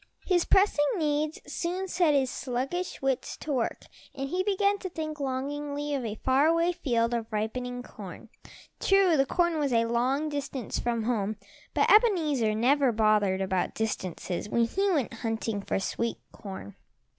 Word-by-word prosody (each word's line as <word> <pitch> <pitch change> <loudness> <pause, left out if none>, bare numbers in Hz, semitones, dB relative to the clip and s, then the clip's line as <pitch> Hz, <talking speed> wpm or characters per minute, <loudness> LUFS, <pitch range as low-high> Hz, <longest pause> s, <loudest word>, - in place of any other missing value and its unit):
His 355 -3 +2
pressing 385 -6 +4
needs 305 -1 0
soon 350 +5 -3
set 340 -5 +2
his 265 -2 +2
sluggish 270 +8 -3
wits 270 -2 -1
to 305 - -5
work 245 -4 -2 0.3
and 275 0 -4
he 360 +4 0
began 400 +1 +1
to 375 - -5
think 310 -3 -5
longingly 285 +2 -3
of 270 -3 -1
a 215 -2 -3
far 265 +6 +3
away 335 +2 +3
field 235 -8 0
of 230 -1 -3
ripening 245 +4 -3
corn. - - -10 0.5
True, 390 -4 +4
the 270 -2 +3
corn 345 -1 +1
was 285 -3 0
a 230 -1 +3
long 255 +6 +1
distance 280 -5 -3
from 235 -2 -1
home, 215 -3 0 0.4
but - - +3
Ebenezer 310 - +4
never 265 +3 +3
bothered 210 -3 +2
about 190 -1 -1
distances 190 -3 -3
when 235 +1 +3
he 390 +12 0
went 290 - 0
hunting 225 -2 -2
for - - -1
sweet 230 +4 -2
corn. 190 - -9
270 Hz, 160 wpm, -28 LUFS, 230-320 Hz, 0.5 s, pressing